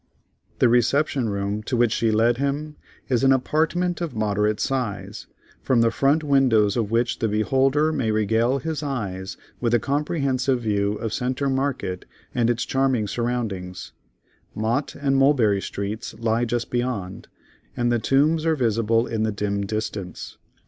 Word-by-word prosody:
The - - +4
reception 125 +1 +2
room 100 +1 -2
to 125 +3 -2
which 120 -2 +3
she 115 +1 +1
led 115 +2 +3
him, 145 +2 -2 0.3
is 125 -2 +1
an 135 - +5
apartment 165 +7 +1
of 170 -3 -3
moderate 105 0 0
size, 125 -7 -3 0.3
from 125 -3 +2
the 115 0 +3
front 140 +6 +2
windows 125 -8 +3
of 115 -4 -1
which 115 +2 0
the 115 - +1
beholder 135 +8 +2
may 120 -7 -1
regale 110 +4 +2
his 155 +1 -3
eyes 100 -10 -4 0.2
with 120 -1 +1
a - - +3
comprehensive 135 -2 0
view 100 -2 0
of 110 +1 -4
Centre 130 +2 -1
Market 130 -9 -2 0.3
and 120 -1 +1
its 120 -1 0
charming 130 -5 +1
surroundings; 105 -6 -3 0.6
Mott 115 +6 -1
and 135 -1 0
Mulberry 125 -8 +3
Streets 100 +3 -5
lie 115 +1 0
just 120 0 -2
beyond, 120 -7 -3 0.5
and 120 0 +1
the 120 - +2
Tombs 150 +7 +2
are 160 -1 +2
visible 115 -2 +1
in 115 -3 -3
the 110 0 +1
dim 100 -1 -2
distance. 105 -4 -5
120 Hz, 155 wpm, -23 LUFS, 110-135 Hz, 0.6 s, an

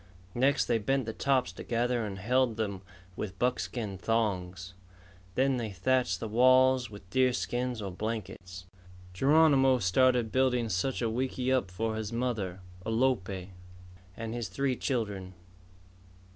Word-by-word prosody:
Next 135 +4 +2
they 115 -2 +1
bent 135 +4 0
the 110 - -4
tops 130 -7 +1
together 120 +4 -1
and 100 -2 -5
held 120 +3 +1
them 100 -4 -2 0.3
with 95 -1 -5
buckskin 115 -4 -2
thongs. 95 -5 -1 0.6
Then 135 0 +2
they 115 -3 -3
thatched 100 0 +1
the 115 - -4
walls 130 +2 +4
with 100 -2 -12
deer 130 -1 +3
skins 120 -2 -2
or 95 - -4
blankets. 95 -3 -5 0.5
Geronimo 135 - +5
started 120 +3 +2
building 125 -3 +2
such 110 +7 -1
a 115 - +1
wickiup 130 -1 0
for 110 +5 -2
his 110 0 -4
mother, 110 -7 -2 0.2
Alope, 110 -6 0 0.7
and 115 0 -5
his 120 -2 -3
three 135 -2 -1
children. 100 -8 -3
115 Hz, 130 wpm, -30 LUFS, 100-130 Hz, 0.7 s, Geronimo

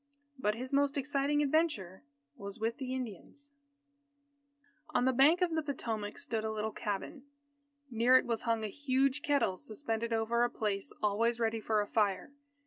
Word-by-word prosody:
But 210 -4 +1
his 255 +4 -6
most 285 +1 +2
exciting 285 +1 +1
adventure 275 - 0 0.3
was 200 0 -8
with 230 +4 -2
Indians. 260 +2 -6 1.4
On 245 - +3
the 260 - +3
bank 295 +8 +5
of 350 -2 +2
the 320 - +1
Potomac 225 -8 -4
stood 220 -2 -3
a 220 - -1
little 220 0 -2
cabin. 210 +9 -4 0.7
Near 240 +3 +5
it - - +1
was 230 -2 -1
hung 230 -2 0
a - - -1
huge 270 +3 +1
kettle 280 -11 +1
suspended 225 +2 -4
over 230 +1 +1
a 240 - +2
place 205 -4 -1
always 225 +3 +1
ready 225 -1 0
for 215 -1 +1
a - - -2
fire. 200 0 0
235 Hz, 160 wpm, -32 LUFS, 215-275 Hz, 1.4 s, bank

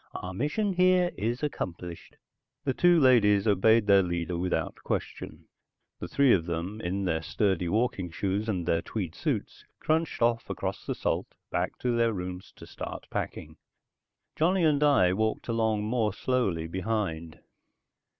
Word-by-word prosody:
Our 90 - -5
mission 150 - -1
here 180 0 +3
is 120 +6 -2
accomplished." 90 - -5 0.5
The 135 -2 0
two 175 +2 +4
ladies 105 -7 +5
obeyed 110 +2 +4
their 100 -1 +6
leader 85 -1 -2
without 90 +1 -1
question. - - -4 0.5
The - - -5
three 140 -3 +4
of 85 -2 +1
them, 85 +6 -4
in 95 +3 -2
their 80 -3 0
sturdy 95 -1 0
walking 105 -4 0
shoes 100 +5 -2
and 90 -5 -1
their 85 -1 +1
tweed 90 -6 -4
suits, - - -3 0.2
crunched 160 +1 0
off 115 0 +1
across - - -4
the - - -1
salt - - -1 0.2
back - - -1
to 125 -1 0
their 115 -1 +2
rooms 90 -1 -6
to - - -12
start - - -7
packing. - - -5 0.8
Johnny 180 +3 +2
and 150 -3 +3
I 135 -12 +4
walked 110 +3 -1
along 110 -2 0
more 110 -2 0
slowly 100 -10 0
behind. 90 -3 -3
105 Hz, 150 wpm, -28 LUFS, 90-125 Hz, 0.8 s, their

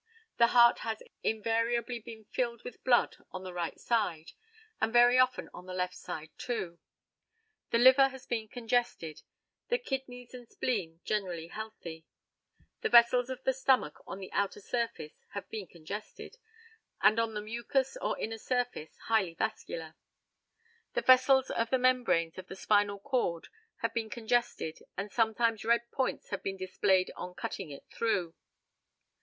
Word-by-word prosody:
The 235 - +6
heart 235 0 +6
has 220 -1 -4 0.2
invariably 230 +2 0
been 220 -1 -11
filled 235 +1 -2
with 245 - -9
blood 245 -2 +3
on 185 0 -7
the 185 -1 -7
right 175 -2 -3
side, 180 -9 0 0.5
and 220 - +2
very 245 +1 +6
often 255 0 +2
on 180 - -10
the 185 - -5
left 180 0 -1
side 160 -2 -7
also. 180 -9 -3 0.9
The - - +3
liver 260 +3 +7
has 265 -1 -10
been 225 -2 -2
congested, 230 -9 -1 0.5
the 485 - +2
kidneys 265 - -5
and 245 -2 -10
spleen 175 -9 -2
generally 180 -6 -2
healthy. 175 -7 -8 0.7
The - - 0
vessels 240 +1 +6
of 260 0 -6
the 265 - +2
stomach 260 - +2
on - - -5
the 190 -1 -8
outer 200 +1 0
surface 230 -8 -3 0.2
have 200 - -5
been 210 -4 -5
congested, 200 - -8 0.6
and 215 +2 +5
on 225 -1 0
the 210 - -2
mucous 235 - -1
or - - -1
inner 225 0 -4
surface 245 -10 -2
highly 205 -7 +1
vascular. 165 -7 -3 1.0
The - - +2
vessels 260 +1 +6
of 230 0 0
the 260 - +3
membranes 245 -11 +2
of 185 - -9
the - - -8
spinal 205 0 +2
cord 200 -7 -1 0.3
have 230 -1 -1
been 225 -1 -2
congested, 235 -7 -1 0.2
and 200 +2 -4
sometimes 225 0 +1
red 235 +1 +2
points 260 - -2
have 200 - -3
been 195 0 -3
displayed 185 0 +2
on 180 0 -7
cutting 190 -5 -5
it 140 - -10
through. 185 -8 0
225 Hz, 155 wpm, -31 LUFS, 185-245 Hz, 1.0 s, liver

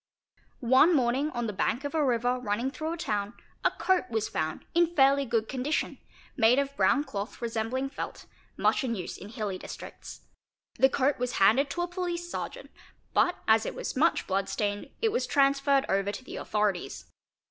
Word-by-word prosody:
One 315 +6 +7
morning 260 +3 +2
on 240 -5 -3
the 210 - -3
bank 225 +6 0
of 285 - -4
a 315 -2 +2
river 245 -1 +1
running 235 +3 -1
through 315 +3 -4
a - - -5
town 210 -7 -2 0.3
a - - +5
coat 375 -1 0
was 220 -2 -1
found 155 0 -3
in 345 0 +2
fairly 275 0 +5
good 225 -3 0
condition, 270 +4 -2 0.4
made 235 0 +5
of 280 0 0
brown 285 0 +3
cloth 210 -7 -6
resembling 235 +4 -2
felt, - - -6 0.3
much - - +2
in 235 -3 -1
use 180 -4 -5
in 200 - -10
hilly 210 -4 -4
districts. - - -9 0.6
The 265 - +6
coat 275 +1 +1
was 250 0 -1
handed 240 +9 +4
to 350 +5 -2
a - - -2
police 350 -1 -3
sergeant, - - -6 0.4
but 355 - +3
as 220 0 +5
it - - -4
was - - -4
much 315 +6 +2
blood 195 0 -1
stained 205 -1 -2
it 450 - +4
was 485 - -1
transferred 275 0 +3
over 195 +1 +1
to 210 - -8
the - - -8
authorities. 210 -4 -1
255 Hz, 185 wpm, -28 LUFS, 220-285 Hz, 0.6 s, One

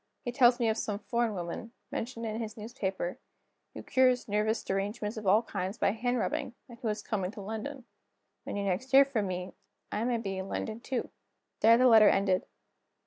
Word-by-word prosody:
He 245 - -1
tells 245 -1 +5
me 235 - +2
of 220 0 +1
some 205 -2 -2
foreign 230 +1 -1
woman, 180 +6 -5 0.2
mentioned 230 0 -4
in 220 +1 -3
his 220 0 -6
newspaper, 200 -5 -4 0.6
who - - -7
cures 255 -1 +3
nervous 210 +2 0
derangements 205 +3 -2
of 215 -3 -5
all 210 +5 +5
kinds 190 -1 -4
by - - +2
hand 245 +3 -1
rubbing, 280 0 -2
and 235 -2 -13
who 235 - -3
is 210 0 -2
coming 195 -5 -2
to 210 - -8
London. 225 +6 -6 0.6
When - - -5
you 200 - -1
next 200 +7 -1
hear 275 +1 +7
from 230 -7 -1
me, 180 0 -4 0.4
I 215 - -1
may 245 -1 +1
be 195 -4 -4
in 190 - -5
London 220 0 -3
too." 255 0 -3 0.5
There 230 +1 +7
the 255 - +4
letter 220 -4 +8
ended. 190 -2 +2
220 Hz, 200 wpm, -30 LUFS, 200-240 Hz, 0.6 s, letter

